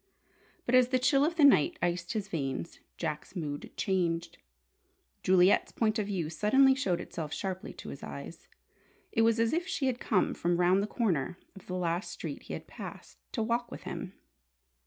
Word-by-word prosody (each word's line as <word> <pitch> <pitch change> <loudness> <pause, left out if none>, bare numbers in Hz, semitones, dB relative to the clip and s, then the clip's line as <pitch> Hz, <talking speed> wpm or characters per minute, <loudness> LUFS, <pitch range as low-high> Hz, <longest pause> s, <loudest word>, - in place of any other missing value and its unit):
But 240 - -1
as 255 -1 +7
the 255 0 +2
chill 275 +2 +3
of 330 +3 +1
the 320 - +3
night 270 - +6
iced 175 +1 -1
his 210 -3 -2
veins, 150 -2 -3 0.2
Jack's 155 +2 -4
mood 145 -5 -4
changed. 170 -3 -1 0.8
Juliet's 185 +1 +4
point 220 -1 +1
of 205 - -1
view 185 -6 -1
suddenly 265 - +4
showed 195 -10 0
itself 155 -3 -5
sharply 190 +3 -4
to - - -9
his - - -8
eyes. - - -8 0.6
It 225 - +2
was 225 0 +4
as 230 +3 +2
if 345 +2 0
she 300 -7 -1
had 255 -2 0
come 200 -5 +1
from 175 0 0
round 180 +2 +4
the 205 - -1
corner 180 - 0 0.2
of 195 - -14
the 185 - -3
last 175 +1 -1
street - - -6
he - - -8
had - - -6
passed, - - -10
to 225 - 0
walk 235 +2 0
with - - -9
him. - - -6
195 Hz, 185 wpm, -30 LUFS, 170-240 Hz, 0.8 s, as